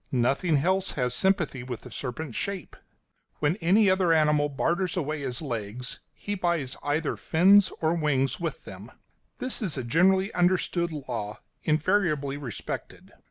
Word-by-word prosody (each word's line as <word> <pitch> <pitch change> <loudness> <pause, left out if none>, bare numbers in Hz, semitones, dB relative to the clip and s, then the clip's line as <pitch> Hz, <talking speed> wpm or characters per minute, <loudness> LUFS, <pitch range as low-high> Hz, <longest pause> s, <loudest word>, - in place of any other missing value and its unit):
Nothing 135 +6 +2
else 185 +6 +1
has 125 -3 -1
sympathy 175 -7 +1
with 125 -2 -6
the - - -12
serpent's 135 0 -5
shape. 195 -6 -4 0.6
When 150 +3 +1
any 200 +4 +4
other 185 -2 +3
animal 150 -2 +3
barters 170 +6 -1
away 155 -2 -2
his 130 +1 -4
legs 120 -1 -4
he 205 - -5
buys 170 -9 0
either 145 +2 -1
fins 195 +4 +5
or 160 0 +2
wings 150 -5 0
with 170 -2 -4
them; - - -10 0.5
this 255 -1 -2
is 180 -10 -2
a 130 - -2
generally 190 - +3
understood 175 -1 +1
law, 120 -8 -5 0.2
invariably 155 -3 +1
respected. 140 -6 -7
155 Hz, 145 wpm, -27 LUFS, 135-185 Hz, 0.6 s, fins